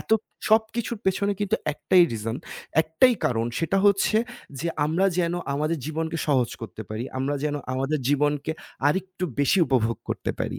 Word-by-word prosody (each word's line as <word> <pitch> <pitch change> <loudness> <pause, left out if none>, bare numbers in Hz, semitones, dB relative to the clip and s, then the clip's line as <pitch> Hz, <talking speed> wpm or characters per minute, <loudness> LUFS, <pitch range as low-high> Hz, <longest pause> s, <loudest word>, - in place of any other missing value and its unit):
এত - - -12 0.4
সবকিছুর 220 +1 +1
পেছনে 200 +2 +1
কিন্তু 205 +2 +1 0.2
একটাই 180 +4 +4
reason 115 +1 -3 0.5
একটাই 235 +11 +4
কারণ 115 -2 +1
সেটা 180 +4 +1
হচ্ছে 200 +2 +3 0.4
যে - - -2 0.2
আমরা 165 +6 +2
যেন 170 -1 +1 0.2
আমাদের 155 +3 0
জীবনকে 160 +1 -2
সহজ 130 -5 +2
করতে 110 -1 -7
পারি। 110 +3 -3
আমরা 135 +2 0
যেন 150 -1 0 0.2
আমাদের 135 +4 0
জীবনকে 145 +1 +1 0.3
আরেকটু 185 +3 -1 0.2
বেশি 145 +7 +3
উপভোগ 115 -3 +1
করতে - - -2
পারি। - - -2
155 Hz, 155 wpm, -25 LUFS, 135-190 Hz, 0.5 s, একটাই